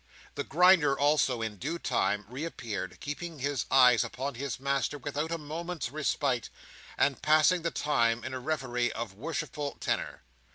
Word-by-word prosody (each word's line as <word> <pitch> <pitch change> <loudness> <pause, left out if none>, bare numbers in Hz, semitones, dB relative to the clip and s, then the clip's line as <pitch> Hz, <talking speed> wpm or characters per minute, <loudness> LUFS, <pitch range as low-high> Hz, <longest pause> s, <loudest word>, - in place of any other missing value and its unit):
The - - -3
Grinder 170 -3 +5
also, 140 -5 +2
in 110 -2 -4
due 155 - -3
time 105 -10 0
reappeared, 120 - -5
keeping 160 +3 -5
his 140 0 -2
eyes 125 -3 +6
upon 135 +3 -4
his 135 +1 -4
master 140 0 0
without 145 +2 -3
a 165 - 0
moment's 160 -2 -5
respite, 140 -5 0 0.5
and 140 -2 +2
passing 155 +4 +4
the 170 - 0
time 120 -7 +1
in 130 - -5
a 130 - -3
reverie 125 -4 -1
of 115 -4 -5
worshipful 145 +4 -4
tenor. - - -2
140 Hz, 155 wpm, -30 LUFS, 125-155 Hz, 0.5 s, eyes